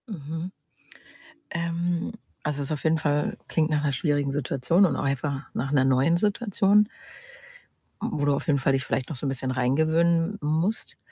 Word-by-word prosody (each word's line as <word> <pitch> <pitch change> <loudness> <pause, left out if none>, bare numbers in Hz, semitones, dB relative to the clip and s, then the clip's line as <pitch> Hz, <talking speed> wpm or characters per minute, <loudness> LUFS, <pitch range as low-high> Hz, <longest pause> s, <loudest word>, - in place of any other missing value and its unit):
Mhm. 165 -2 -6 1.0
Ähm, 170 +1 -2 0.3
also, 145 -1 -1
es 140 - -2
ist - - -3
auf 150 - -3
jeden 160 0 +3
Fall 150 -2 0
klingt 160 -1 +1
nach 150 -1 +1
'ner 145 -2 +1
schwierigen 145 0 0
Situation 145 +6 +2
und 155 -7 +1
auch - - -2
einfach 140 +1 -1
nach 135 +3 -2
'ner 140 -3 +4
neuen 135 +6 +3
Situation 205 0 +3 1.1
mm, - - -1
wo 145 - +1
du 145 -1 +3
auf - - -5
jeden 145 -3 +3
Fall 135 0 +2
dich 135 -1 +1
vielleicht 130 - -2
noch 155 - -4
so 130 - -5
'n - - +1
bisschen 130 -1 -2
reingewöhnen 160 +8 +2
musst. 160 +8 -1
150 Hz, 185 wpm, -26 LUFS, 140-170 Hz, 1.1 s, ner